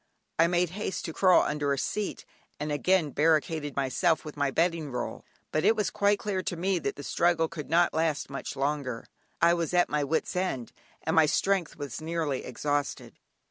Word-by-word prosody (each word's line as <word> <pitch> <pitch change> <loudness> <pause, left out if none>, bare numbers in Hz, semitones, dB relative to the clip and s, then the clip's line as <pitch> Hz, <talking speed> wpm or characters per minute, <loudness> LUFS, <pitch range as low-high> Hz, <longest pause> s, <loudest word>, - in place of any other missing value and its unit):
I 165 - +6
made 175 -1 +1
haste 190 -1 -4
to 160 - -5
crawl 185 +1 +5
under 150 -1 -1
a - - -2
seat, 210 +8 -3 0.3
and 150 +1 -3
again 160 +1 +2
barricaded 155 -1 +1
myself 140 +4 +1
with 150 - -7
my 145 -1 +1
bedding 165 0 0
roll, 125 - -4 0.3
but 155 - 0
it 225 - +5
was 210 -2 0
quite 205 0 +2
clear 195 -2 -2
to 180 - -3
me 185 +1 +1
that - - -3
the 145 - -8
struggle 170 +2 +2
could 155 -3 -8
not 170 +2 +3
last 160 -2 0
much 140 0 -6
longer; 135 -4 -2 0.4
I 170 0 +6
was 170 0 -1
at 175 - +4
my 150 -1 0
wit's 160 +5 -1
end, 180 -10 -2 0.3
and 160 - 0
my 160 -1 +6
strength 190 +2 +1
was 140 -1 -6
nearly 160 -4 -2
exhausted. 145 +3 -3
160 Hz, 190 wpm, -28 LUFS, 145-175 Hz, 0.4 s, I